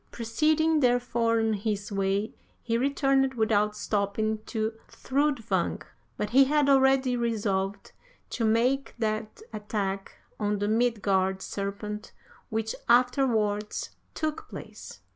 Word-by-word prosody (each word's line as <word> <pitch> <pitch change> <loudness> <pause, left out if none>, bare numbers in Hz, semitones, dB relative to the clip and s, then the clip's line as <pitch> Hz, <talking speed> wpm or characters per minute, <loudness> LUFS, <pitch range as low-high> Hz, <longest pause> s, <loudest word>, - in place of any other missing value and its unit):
Proceeding, 310 +7 +1
therefore, 240 -3 +2
on 225 0 +1
his 205 0 -3
way, 195 +2 0 0.3
he 230 - -1
returned 270 +1 +2
without 210 -2 +2
stopping 210 +1 -1
to 220 -1 -2
Thrudvang. 275 -4 -1 0.3
But 210 - -3
he 270 +2 +7
had 295 +1 +2
already 265 -1 +4
resolved 205 -4 -1 0.4
to 235 - -2
make 240 +5 +1
that 215 - -3
attack 200 -2 -3 0.3
on 210 -1 0
the 205 +1 -1
Midgard 200 -4 +1
serpent 210 +2 -5 0.4
which 220 0 -2 0.2
afterwards 235 -4 +2 0.2
took 310 0 -3
place. - - -10
225 Hz, 110 wpm, -27 LUFS, 210-255 Hz, 0.4 s, he